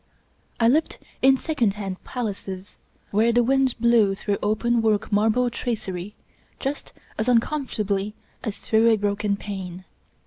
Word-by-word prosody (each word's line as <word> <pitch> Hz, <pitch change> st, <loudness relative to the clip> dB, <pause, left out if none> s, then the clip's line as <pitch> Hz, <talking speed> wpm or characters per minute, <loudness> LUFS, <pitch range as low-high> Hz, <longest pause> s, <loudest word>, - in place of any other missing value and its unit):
I 230 Hz, -, +4 dB
lived 300 Hz, +7 st, +2 dB, 0.2 s
in 265 Hz, 0 st, +6 dB
second 245 Hz, -10 st, 0 dB
hand 195 Hz, -3 st, -5 dB
palaces 200 Hz, -5 st, -5 dB, 0.4 s
where 220 Hz, +3 st, +3 dB
the 240 Hz, +1 st, +4 dB
wind 265 Hz, +1 st, +2 dB
blew 225 Hz, -4 st, +4 dB
through 200 Hz, 0 st, -2 dB
open 230 Hz, +3 st, +1 dB
work 215 Hz, -2 st, +1 dB
marble 220 Hz, +4 st, +2 dB
tracery 210 Hz, -5 st, -4 dB, 0.4 s
just 280 Hz, +1 st, -4 dB, 0.3 s
as 220 Hz, -, 0 dB
uncomfortably 215 Hz, -6 st, 0 dB, 0.3 s
as 215 Hz, -3 st, -3 dB
through 225 Hz, +1 st, +3 dB
a 225 Hz, -, +4 dB
broken 205 Hz, 0 st, 0 dB
pane. 185 Hz, -3 st, -6 dB
220 Hz, 135 wpm, -24 LUFS, 200-240 Hz, 0.4 s, in